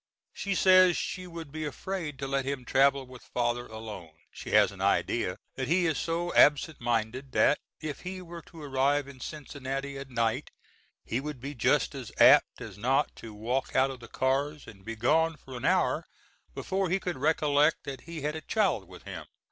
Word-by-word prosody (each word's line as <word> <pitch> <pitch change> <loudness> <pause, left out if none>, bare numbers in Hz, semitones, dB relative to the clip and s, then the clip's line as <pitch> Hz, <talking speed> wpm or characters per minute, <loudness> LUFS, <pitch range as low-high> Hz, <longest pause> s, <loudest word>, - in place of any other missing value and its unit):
She 200 -1 -2
says 185 -1 +6
she 185 0 -4
would 165 -4 -8
be 155 +1 -4
afraid 155 +1 -4
to 135 0 -4
let 135 0 0
him 135 -2 -4
travel 135 +1 +3
with 125 -1 -13
Father 120 0 -2
alone; 110 -7 -8 0.2
she - - -9
has - - +5
an - - -10
idea - - +1 0.2
that 130 -1 -2
he 175 +4 +3
is 160 -4 +1
so 170 +1 -2
absent 150 +1 +4
minded 120 +3 -1
that 150 - +4 0.2
if 155 -2 -4
he 185 +1 -6
were 170 -1 -9
to 165 -3 -11
arrive 140 +1 +1
in 140 -2 -12
Cincinnati 140 -1 -5
at 135 -1 -8
night 115 -2 0 0.6
he 120 - -1
would 150 -2 -6
be 140 +4 -6
just 120 - +2
as - - -7
apt - - +6
as 95 - -8
not 135 +6 +1
to 115 - -9
walk 120 +6 -2
out 135 +1 +4
of 130 - -9
the 115 - -11
cars 140 +5 -1
and 100 -3 -13
be 115 +3 -5
gone 160 +8 +2
for 130 -3 -11
an 120 - -5
hour - - +2 0.5
before 190 -1 -1
he 190 +3 +1
would 180 -1 -2
recollect 150 +1 +3
that 135 -2 -6
he 165 -1 -7
had 150 +2 -2
a 160 - -5
child 185 - 0
with 90 0 -13
him. 85 -6 -8
140 Hz, 195 wpm, -29 LUFS, 125-160 Hz, 0.6 s, says